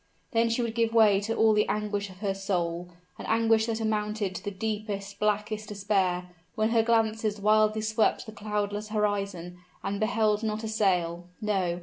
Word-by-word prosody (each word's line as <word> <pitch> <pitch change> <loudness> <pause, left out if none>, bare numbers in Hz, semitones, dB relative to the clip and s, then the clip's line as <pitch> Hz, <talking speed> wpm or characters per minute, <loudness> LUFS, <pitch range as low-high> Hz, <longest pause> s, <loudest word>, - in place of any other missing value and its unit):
Then 230 0 +2
she 230 +2 0
would 230 -1 -2
give 230 -1 0
way 210 -3 +6
to 225 +3 -2
all 220 -1 +4
the 210 0 +2
anguish 205 -1 -2
of 185 +1 -14
her 200 -2 0
soul 175 -3 -2 0.3
an - - -6
anguish 225 0 +3
that 225 -1 -1
amounted 210 -2 -1
to - - -7
the - - -2
deepest, 205 -1 -4
blackest 210 0 -1
despair, 195 -3 0 0.3
when 215 0 +1
her 230 -1 +4
glances 220 -2 +1
wildly 215 +1 +3
swept 215 +2 +1
the 220 - -8
cloudless 210 0 -3
horizon, 200 -5 -2 0.2
and 200 0 -2
beheld 215 -1 +2
not 220 0 -2
a - - -2
sail 180 -5 0
no! 190 -5 0
210 Hz, 180 wpm, -28 LUFS, 200-220 Hz, 0.3 s, way